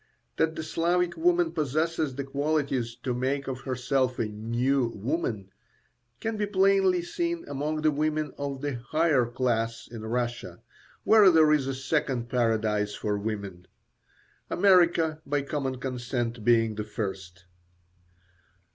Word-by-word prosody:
That 160 0 +1
the 160 - -4
Slavic 170 +2 0
woman 170 0 +2
possesses 155 -1 -1
the 140 - -3
qualities 140 -4 -1
to 125 - -1
make 135 +3 -1
of 130 -1 -4
herself 130 0 0
a 115 - 0
"new 120 +5 0
woman" 105 - -3 0.7
can 225 -1 -3
be 210 0 -1
plainly 190 -2 +3
seen 340 - -3
among 150 +2 -3
the 155 - +4
women 155 0 -1
of 140 -1 -4
the 145 -3 -2
higher 155 -6 +3
class 115 -2 -1
in 115 -2 -9
Russia, 120 -5 -3 0.4
where 215 -3 +7
there 160 -3 +5
is 140 -3 +1
a 135 - -2
second 130 -3 -1
paradise 110 -4 0
for 105 -1 -2
women; 100 -4 -5 0.8
America, 170 -4 +3
by 145 -1 -1
common 135 -2 -2
consent, 120 -2 -3
being 115 -1 +3
the 105 0 -4
first. 95 -5 -6
135 Hz, 135 wpm, -27 LUFS, 115-160 Hz, 0.8 s, where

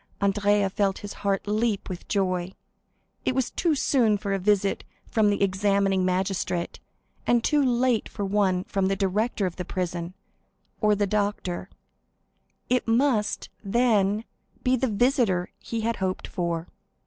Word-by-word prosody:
Andrea 200 0 +2
felt 195 -1 +1
his 205 - -6
heart 200 -1 0
leap 210 0 0
with 180 -2 -7
joy. 185 -2 -1 0.7
It 255 - 0
was 265 -2 0
too 330 -4 +1
soon 235 -6 +3
for 200 -1 -3
a 195 - 0
visit 200 0 +1 0.2
from 215 -2 +2
the 200 -1 +1
examining 195 0 +2
magistrate, 185 -1 -1 0.5
and 240 -1 +3
too 295 -2 +3
late 245 -2 +2
for 205 - -4
one 190 -2 +1
from 195 -1 0
the 195 - +1
director 200 +3 0
of 180 -2 -4
the 180 - -3
prison, 175 -1 -4 0.6
or 210 -1 +3
the 205 0 +1
doctor; 200 -3 -2 1.0
it 250 -1 +1
must, 230 -2 +1
then, 210 -1 +2 0.4
be 255 +1 +3
the 260 +1 0
visitor 225 -5 +1
he 230 -1 -4
hoped 190 -5 -2
for. 170 -2 -2
200 Hz, 145 wpm, -26 LUFS, 190-225 Hz, 1.0 s, soon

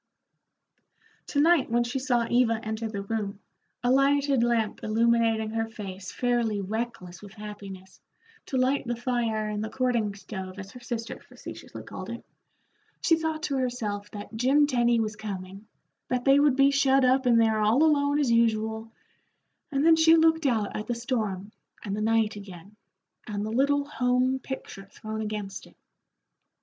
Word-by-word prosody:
To 285 - -1
night 325 -2 +4
when 240 +1 +2
she 240 +3 -3
saw 245 -3 +1
Eva 240 -2 +2
enter 220 +1 -3
the 200 -2 -4
room, 200 -1 -3 0.4
a 245 - +2
lighted 275 0 +3
lamp 235 -3 0
illuminating 225 0 +2
her 225 0 -2
face 195 -3 -8
fairly 240 -4 0
reckless 200 -3 -5
with 205 -1 -12
happiness, 200 -3 -10 0.5
to 265 - -2
light 260 +1 +1
the 240 - -1
fire 235 -3 -1
in 210 0 -3
the 220 - -3
courting 240 -6 0
stove 190 -1 -8
as 195 -1 -8
her 250 - -11
sister 235 -1 -5
facetiously - - -10
called - - -8
it, - - -7 0.8
she 330 - +4
thought 320 -1 -3
to 280 -6 -1
herself 220 -5 -3
that 205 +1 -9
Jim 270 +6 +4
Tenny 240 -4 +2
was 215 -1 -2
coming, 195 -1 -7 0.4
that 250 -1 -2
they 275 +1 +6
would 290 -2 +4
be 275 +1 +5
shut 275 -1 +3
up 260 +1 +3
in 235 -1 +5
there 220 -1 +3
all 220 +7 +3
alone 285 -2 +3
as 280 -5 +1
usual, 220 -1 +1 0.8
and 275 +1 +1
then 330 0 +7
she 320 0 +6
looked 320 -1 +3
out 220 -5 0
at 215 - -4
the 240 - -1
storm 215 -5 -3 0.3
and 200 -2 -3
the 210 - -3
night 220 -1 +2
again, 200 0 -11 0.5
and 205 -1 -3
the 215 - -4
little 280 +4 +2
home 255 -1 +1
picture 255 -7 -7
thrown 215 +2 -7
against 210 -3 -5
it. - - -22
230 Hz, 165 wpm, -27 LUFS, 210-260 Hz, 0.8 s, then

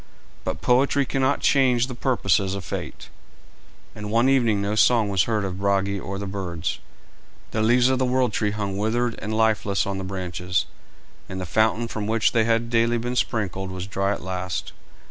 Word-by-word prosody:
But 80 - -4
poetry 140 +3 +3
cannot 135 +2 0
change 125 -3 +3
the 130 - -7
purposes 100 -6 +1
of 95 -3 -6
fate, - - -6 0.8
and 105 0 -7
one 115 +4 +3
evening 120 -6 +3
no 100 +1 -1
song 110 -1 +4
was 95 -4 +2
heard 110 -3 0
of 95 -1 -5
Brage 100 0 +1
or 100 0 -5
birds, 95 -4 -4 0.7
the 110 - -1
leaves 120 +3 +4
of 130 -1 +1
the 130 - +2
world 125 -3 +1
tree 105 - +1
hung 100 -2 -3
withered 115 +3 0
and 105 - -4
lifeless 110 -3 +2
on 100 -1 -3
the - - -4
branches, 90 -1 -2 0.6
and 95 - -5
the 90 - -4
fountain 110 +5 +1
from 105 -2 -4
which 110 0 +2
they 115 -1 +2
had 115 0 +1
daily 115 0 +2
been 120 +2 -3
sprinkled 95 -6 -1
was 95 -1 -5
dry 100 0 -1
at 100 - -4
last. 90 -2 -4
105 Hz, 185 wpm, -24 LUFS, 95-120 Hz, 0.8 s, song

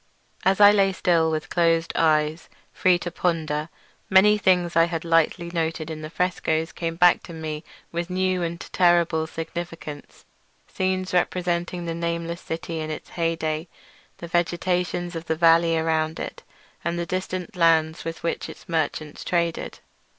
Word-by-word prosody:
As 190 +1 +3
I 205 0 +9
lay 195 -2 +3
still 170 -3 +2
with 155 -1 -3
closed 165 -1 +2
eyes, 155 0 +1 0.2
free 185 -1 +3
to 175 0 -5
ponder, 160 -3 -1 0.4
many 200 +2 +6
things 180 -4 +2
I 165 0 +6
had 170 -1 -4
lightly 165 +1 +2
noted 160 -1 -2
in 155 -1 -6
the 155 - -6
frescoes 165 -2 -1
came 165 -1 -4
back 175 +1 +5
to 170 - -11
me 155 -1 -5 0.3
with 170 +1 -3
new 185 0 0
and 170 0 -3
terrible 170 -3 +3
significance—scenes 170 +3 -6
representing 175 -1 0
the 165 - -2
nameless 170 0 -3
city 165 0 -5
in 155 0 -4
its 155 - -6
heyday, 165 -1 -2 0.5
the 170 - -8
vegetation 175 +1 -1
of 165 0 -5
the 160 - 0
valley 165 0 +4
around 160 0 0
it, - - -6 0.4
and 170 +1 -1
the 170 - -2
distant 185 +1 -4
lands 165 -2 +3
with 165 0 -6
which 170 - -2
its - - -12
merchants 155 -2 -2
traded. 170 -2 -1
170 Hz, 150 wpm, -24 LUFS, 160-175 Hz, 0.5 s, I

